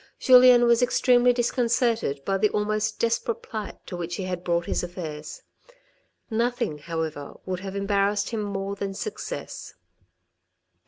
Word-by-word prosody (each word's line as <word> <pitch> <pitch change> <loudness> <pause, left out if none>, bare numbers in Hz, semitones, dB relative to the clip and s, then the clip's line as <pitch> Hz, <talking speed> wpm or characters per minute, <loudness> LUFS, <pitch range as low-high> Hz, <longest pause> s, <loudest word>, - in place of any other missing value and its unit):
Julien 250 -1 +7
was 235 0 +4
extremely 245 0 +4
disconcerted 235 - 0
by 195 0 0
the 210 +1 +3
almost 215 +1 -1
desperate 230 0 -1
plight 215 -2 -6
to 180 - -7
which 175 0 -4
he 195 - -4
had 180 -1 -4
brought 170 -1 0
his - - -1
affairs. 160 -4 -7 0.8
Nothing, 235 - -1
however, 160 -2 -5
would 185 -1 -3
have 195 0 -7
embarassed 200 +1 0
him 225 -2 -2
more 200 -1 -3
than 195 -1 -4
success. 430 - -6
205 Hz, 140 wpm, -25 LUFS, 180-235 Hz, 0.8 s, Julien